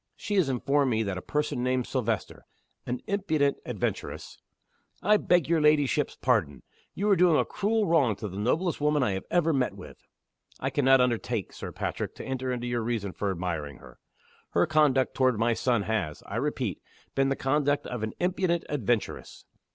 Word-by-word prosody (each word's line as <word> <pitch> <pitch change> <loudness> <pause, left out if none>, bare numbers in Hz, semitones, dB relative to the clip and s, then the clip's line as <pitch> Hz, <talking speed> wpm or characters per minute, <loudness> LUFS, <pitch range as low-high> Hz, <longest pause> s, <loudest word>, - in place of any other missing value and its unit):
She 210 - -5
has 175 -8 +3
informed 135 +2 +1
me 110 -2 +1
that 100 -3 -3
a - - -10
person 150 -1 -2
named 125 0 0
Silvester, 115 -5 -3 0.4
an 125 0 -3
impudent 160 -8 +1
adventuress - - -4 0.3
" - - -36
"I 210 0 +5
beg 175 -6 +2
your 165 -1 +2
ladyship's 150 -1 +2
pardon. 85 - 0 0.3
You 205 - -1
are - - +6
doing 175 -3 +4
a - - +2
cruel 215 +1 0
wrong 145 - +3
to 105 - -5
the 95 0 -6
noblest 155 - 0
woman 150 -1 +2
I 115 - +1
have 95 -1 -4
ever 165 -2 +2
met 130 -3 0
with." - - -13 0.5
"I - - -2
can 145 - 0
not 135 -1 +6
undertake, 120 -3 -1
Sir - - -7
Patrick, - - -4
to - - -8
enter 130 -1 -2
into 120 -1 -3
your 120 -1 -1
reasons 110 -4 -3
for 100 - -1
admiring 85 -7 -3
her. - - -16 0.5
Her - - +4
conduct 150 -5 +3
toward 130 -3 +2
my 115 +2 +2
son 120 -2 +1
has, 100 -9 -2
I - - -5
repeat, - - -2 0.3
been 135 0 +2
the 135 - +1
conduct 145 +1 +1
of 125 -3 -5
an 110 0 -3
impudent 180 -1 0
adventuress." 120 -5 -2
130 Hz, 190 wpm, -28 LUFS, 110-150 Hz, 0.5 s, are